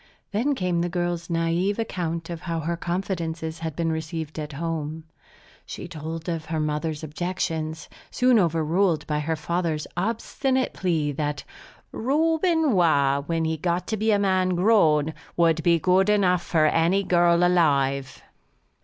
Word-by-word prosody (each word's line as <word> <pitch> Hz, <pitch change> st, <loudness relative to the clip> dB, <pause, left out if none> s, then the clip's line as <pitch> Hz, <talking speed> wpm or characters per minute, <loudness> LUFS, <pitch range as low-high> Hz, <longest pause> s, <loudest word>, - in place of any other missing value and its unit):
Then 245 Hz, +8 st, +1 dB
came 180 Hz, -5 st, 0 dB
the 175 Hz, -, -1 dB
girl's 175 Hz, 0 st, -2 dB
naïve 170 Hz, +4 st, 0 dB
account 170 Hz, -6 st, -3 dB
of 170 Hz, -, -6 dB
how 165 Hz, -2 st, -3 dB
her 170 Hz, +2 st, -2 dB
confidences 170 Hz, -2 st, -3 dB
had 160 Hz, -2 st, -4 dB
been 165 Hz, -1 st, 0 dB
received 160 Hz, 0 st, -4 dB
at 150 Hz, -1 st, -5 dB
home. 160 Hz, 0 st, -4 dB, 0.6 s
She -, -, -8 dB
told 160 Hz, +2 st, -6 dB
of 165 Hz, -2 st, -3 dB
her 160 Hz, 0 st, -2 dB
mother's 150 Hz, +1 st, -2 dB
objections, 160 Hz, -1 st, -3 dB, 0.2 s
soon 250 Hz, -2 st, +3 dB
overruled 165 Hz, -1 st, +1 dB
by 150 Hz, -1 st, -1 dB
her 160 Hz, +2 st, -1 dB
father's 160 Hz, 0 st, -2 dB
obstinate 235 Hz, +7 st, -1 dB
plea 160 Hz, -5 st, 0 dB
that 145 Hz, 0 st, -3 dB, 0.5 s
"Reuben 320 Hz, +4 st, +1 dB
Waugh, 140 Hz, -6 st, +3 dB
when 165 Hz, -1 st, 0 dB
he 160 Hz, 0 st, -1 dB
got 175 Hz, +2 st, -1 dB
to 220 Hz, -, 0 dB
be 220 Hz, +2 st, 0 dB
a 210 Hz, -, +4 dB
man 185 Hz, -2 st, +1 dB
grown, 160 Hz, -6 st, +3 dB, 0.2 s
would 165 Hz, -1 st, +3 dB
be 170 Hz, +1 st, +4 dB
good 185 Hz, +4 st, +3 dB
enough 185 Hz, -4 st, +3 dB
for 160 Hz, -3 st, +2 dB
any 170 Hz, +5 st, +2 dB
girl 175 Hz, -1 st, +3 dB
alive." 140 Hz, -6 st, +1 dB
170 Hz, 150 wpm, -24 LUFS, 160-185 Hz, 0.6 s, a